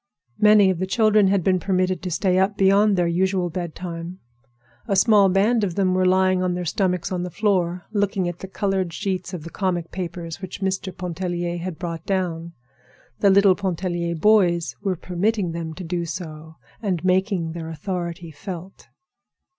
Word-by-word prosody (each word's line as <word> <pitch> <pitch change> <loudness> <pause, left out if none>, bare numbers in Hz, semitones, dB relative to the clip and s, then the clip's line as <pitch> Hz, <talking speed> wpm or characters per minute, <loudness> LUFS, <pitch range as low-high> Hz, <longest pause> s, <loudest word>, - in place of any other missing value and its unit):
Many 210 -2 +6
of 175 - -3
the 185 - -1
children 215 0 +4
had 195 -2 +2
been 185 0 +2
permitted 185 -1 0
to 185 - -4
sit 180 +2 +1
up 190 +2 +2
beyond 200 +2 +4
their 175 - +2
usual 180 +1 0
bedtime. 170 0 -5 0.7
A 200 - +1
small 200 0 +5
band 210 +5 +2
of 180 -4 -1
them 190 -2 +2
were 185 0 +2
lying 185 0 +3
on 180 -1 0
their 180 0 -3
stomachs 180 +1 -1
on 180 -1 -1
the 180 - -3
floor 180 -3 0
looking 200 -3 0
at 175 0 -5
the 190 - -7
colored 190 -3 -1
sheets 190 0 -3
of 180 -5 -6
the 165 - -9
comic 175 -4 -2
papers 170 -2 -6
which 185 -1 -7
Mr. 190 0 -2
Pontellier 175 -1 -3
had 175 -1 -5
brought 170 -3 -5
down. 170 -3 -2 0.7
The 200 - +4
little 195 0 +6
Pontellier 175 -2 -2
boys 175 - +3
were 190 -2 -1
permitting 185 +2 -1
them 165 -1 -5
to 185 - -7
do 170 0 -2
so, 160 -2 -7 0.3
and 185 -6 -2
making 185 -2 +1
their 165 -1 -6
authority 170 0 -5
felt. 185 +3 -9
185 Hz, 175 wpm, -23 LUFS, 170-195 Hz, 0.7 s, Many